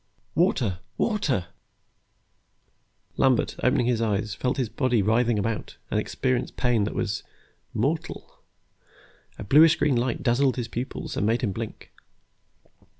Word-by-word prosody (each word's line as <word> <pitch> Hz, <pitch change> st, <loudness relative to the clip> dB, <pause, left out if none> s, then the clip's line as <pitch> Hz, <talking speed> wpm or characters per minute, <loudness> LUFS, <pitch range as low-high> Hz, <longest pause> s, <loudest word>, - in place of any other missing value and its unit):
"Water, 130 Hz, -, +1 dB, 0.2 s
water!" 155 Hz, -, 0 dB, 1.7 s
Lambert, 130 Hz, -3 st, +2 dB
opening 125 Hz, -1 st, +3 dB
his 120 Hz, -2 st, +1 dB
eyes, 105 Hz, -2 st, 0 dB
felt 125 Hz, +4 st, -1 dB
his 130 Hz, -3 st, 0 dB
body 120 Hz, -1 st, +1 dB
writhing 115 Hz, +2 st, +2 dB
about, 110 Hz, +2 st, -3 dB
and -, -, +2 dB
experienced 130 Hz, -1 st, -2 dB
pain 120 Hz, -5 st, +2 dB
that -, -, -4 dB
was 105 Hz, -3 st, -2 dB, 0.5 s
mortal. -, -, -3 dB, 1.0 s
A -, -, -6 dB
bluish 150 Hz, +9 st, +6 dB
green 145 Hz, -4 st, +1 dB
light 120 Hz, 0 st, -1 dB
dazzled 130 Hz, +2 st, +2 dB
his 120 Hz, -2 st, -3 dB
pupils 120 Hz, +3 st, -5 dB
and 100 Hz, -, 0 dB
made 115 Hz, +1 st, +1 dB
him 110 Hz, -6 st, 0 dB
blink. 115 Hz, +2 st, -7 dB
120 Hz, 130 wpm, -25 LUFS, 110-130 Hz, 1.7 s, bluish